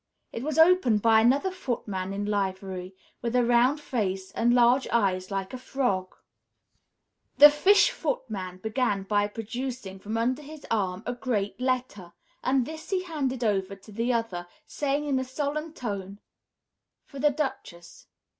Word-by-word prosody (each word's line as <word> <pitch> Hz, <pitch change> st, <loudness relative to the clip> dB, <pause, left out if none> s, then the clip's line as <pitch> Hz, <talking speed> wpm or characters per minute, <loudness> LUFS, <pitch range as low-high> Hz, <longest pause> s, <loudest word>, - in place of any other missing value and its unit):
It 230 Hz, -, -4 dB
was 305 Hz, +3 st, -3 dB
opened 320 Hz, -, +5 dB
by 225 Hz, -1 st, +6 dB
another 275 Hz, +11 st, +3 dB
footman 210 Hz, -, -4 dB
in 200 Hz, +1 st, -3 dB
livery, 190 Hz, -2 st, -3 dB, 0.3 s
with 235 Hz, 0 st, -2 dB
a 245 Hz, -1 st, +4 dB
round 245 Hz, +5 st, +3 dB
face 195 Hz, -9 st, -3 dB
and 235 Hz, +4 st, +2 dB
large 245 Hz, +2 st, +4 dB
eyes 185 Hz, -5 st, +1 dB
like 195 Hz, 0 st, -4 dB
a 255 Hz, -, -5 dB
frog. 245 Hz, -9 st, -2 dB, 1.2 s
The 295 Hz, +1 st, +10 dB
Fish 380 Hz, +8 st, +5 dB
Footman 215 Hz, -, -4 dB
began 220 Hz, -3 st, 0 dB
by 205 Hz, +1 st, +1 dB
producing 225 Hz, -2 st, -6 dB
from 215 Hz, +3 st, -4 dB
under 250 Hz, +5 st, 0 dB
his 300 Hz, 0 st, -11 dB
arm 190 Hz, -4 st, -1 dB
a 245 Hz, -, -2 dB
great 240 Hz, -5 st, -2 dB
letter, 250 Hz, -9 st, -2 dB, 0.3 s
and 260 Hz, -1 st, +2 dB
this 315 Hz, +2 st, -8 dB
he 375 Hz, -2 st, 0 dB
handed 275 Hz, -8 st, -2 dB
over 195 Hz, -3 st, 0 dB
to 200 Hz, +2 st, -16 dB
the 230 Hz, +4 st, -1 dB
other, 225 Hz, -7 st, -2 dB, 0.2 s
saying, 290 Hz, 0 st, -1 dB
in 275 Hz, -3 st, +1 dB
a -, -, -1 dB
solemn 295 Hz, +4 st, -3 dB
tone, 200 Hz, -, -5 dB, 0.9 s
"For 280 Hz, -, -10 dB
the 295 Hz, +2 st, +4 dB
Duchess. 265 Hz, -, -5 dB
235 Hz, 155 wpm, -27 LUFS, 195-270 Hz, 1.2 s, The